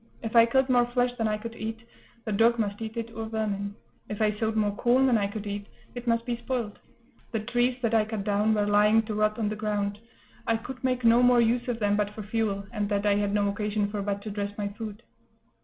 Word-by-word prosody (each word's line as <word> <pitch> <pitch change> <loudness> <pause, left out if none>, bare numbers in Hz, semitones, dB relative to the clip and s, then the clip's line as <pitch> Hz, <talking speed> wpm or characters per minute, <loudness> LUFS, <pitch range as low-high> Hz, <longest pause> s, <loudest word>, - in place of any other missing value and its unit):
If 225 0 -4
I 230 0 +8
killed 265 +2 +2
more 245 -2 +3
flesh 245 0 +1
than 225 -3 0
I 210 0 0
could 230 +2 -7
eat, 225 +1 -6 0.4
the 215 - -2
dog 230 +3 +4
must 205 -1 -2
eat 225 +1 -5
it, 230 0 -4
or 225 0 -4
vermin; 205 -2 -3 0.3
if 210 - -5
I 215 -1 +3
sowed 220 +1 -1
more 205 -2 +1
corn 245 +4 +3
than 255 -3 +4
I 205 -2 +2
could 205 +1 -6
eat, 205 0 -5 0.3
it 245 0 -8
must 230 0 +1
be 240 -1 -2
spoiled; 235 -3 -4 0.5
the 225 - -1
trees 245 +3 0
that 230 -1 +1
I 220 -1 +4
cut 215 -2 -4
down 210 +1 +2
were 205 -1 +1
lying 210 +2 +4
to 215 0 -5
rot 215 0 +1
on 220 -2 0
the 215 - -3
ground; 205 -1 -2 0.5
I 225 - +2
could 255 +3 -9
make 255 -1 0
no 230 +1 +6
more 245 -1 +5
use 235 +2 +2
of 245 -2 -1
them 205 -2 +1
but 210 0 -1
for 215 - -6
fuel, 205 -2 -1
and 210 -3 -2
that 200 0 0
I 205 - +4
had 205 0 0
no 205 0 +2
occasion 210 0 -1
for 205 -1 -3
but 200 0 -3
to 215 - -5
dress 205 0 -4
my 205 -1 -2
food. 215 +1 -8
220 Hz, 250 wpm, -27 LUFS, 205-230 Hz, 0.5 s, I